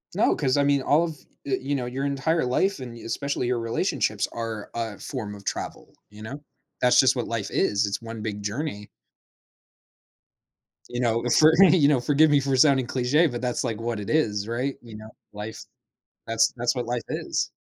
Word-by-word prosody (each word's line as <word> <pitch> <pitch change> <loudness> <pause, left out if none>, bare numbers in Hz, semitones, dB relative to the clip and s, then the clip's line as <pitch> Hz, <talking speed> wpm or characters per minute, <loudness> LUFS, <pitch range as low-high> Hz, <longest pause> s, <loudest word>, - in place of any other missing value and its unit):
No, - - +3
'cause, 130 0 +1
I 140 - +3
mean, 140 -1 +2
all 150 +5 +3
of, 160 -3 -6 0.3
eh, 135 -2 0
you 140 +2 -2
know, 125 -3 -2
your 130 +3 -3
entire 140 +2 0
life 190 +8 +1
and 120 -2 -8
especially 135 +2 -3
your 125 -1 0
relationships 115 0 -1
are 115 -3 -5
a 115 -4 -4
form 105 -6 -5
of 100 - -13
travel, - - -5 0.2
you 105 +1 -14
know? 140 +6 -7 0.4
That's 125 - +5
just 130 0 +5
what 120 - -2
life 115 -3 -3
is; 100 0 +1
It's 100 +3 -3
one 115 -1 -7
big 105 -1 -4
journey. 105 -1 -4 2.0
You 120 0 -3
know, 115 0 +1
for 155 +1 +7 0.2
you 155 -6 +5
know, 145 -4 +3
forgive 150 +4 +4
me 145 - +5
for 135 -1 0
sounding 130 -2 +4
cliche, 135 +7 +2
but 120 -3 -5
that's, 125 0 -1
like, 115 -3 -3
what 115 -2 -2
it 100 - -6
is, 105 -9 +1
right, 125 +4 -2
you 115 -3 -12
know, 110 0 -11 0.2
life 105 +2 -7 0.6
that's 115 0 +2
that's 120 +2 0
what 120 -2 -3
life 120 -1 -2
is. - - -2
125 Hz, 195 wpm, -25 LUFS, 115-140 Hz, 2.0 s, for